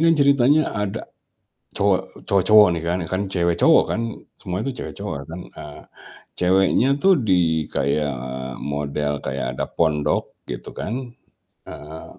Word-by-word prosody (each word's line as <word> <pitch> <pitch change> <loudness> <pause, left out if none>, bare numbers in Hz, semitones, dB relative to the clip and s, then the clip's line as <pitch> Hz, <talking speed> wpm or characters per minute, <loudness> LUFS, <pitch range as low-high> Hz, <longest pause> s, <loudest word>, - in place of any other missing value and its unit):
kan 165 0 +5
ceritanya 140 +1 +4
ada 105 -2 -3 0.7
cowok - - 0
cowok-cowok 105 +2 +6
nih - - -8
kan, 90 +2 0
kan 95 +1 0
cewek-cowok 85 -2 +3
kan. 115 - -1 0.4
Semua 95 +2 -4
itu 135 - -2
cewek-cowok - - -5
kan, 85 +3 -7 0.2
eee, 75 -1 -9 0.6
ceweknya 95 +7 +3
tuh 195 0 +6
di, 85 - +1
kayak 70 +1 0 0.5
model 75 0 -2
kayak 65 -2 -4
ada - - -1
pondok 75 -3 0 0.2
gitu - - -6
kan. 125 +2 -5 0.5
Heeh, 80 +2 -10
90 Hz, 130 wpm, -22 LUFS, 75-110 Hz, 0.7 s, cowok-cowok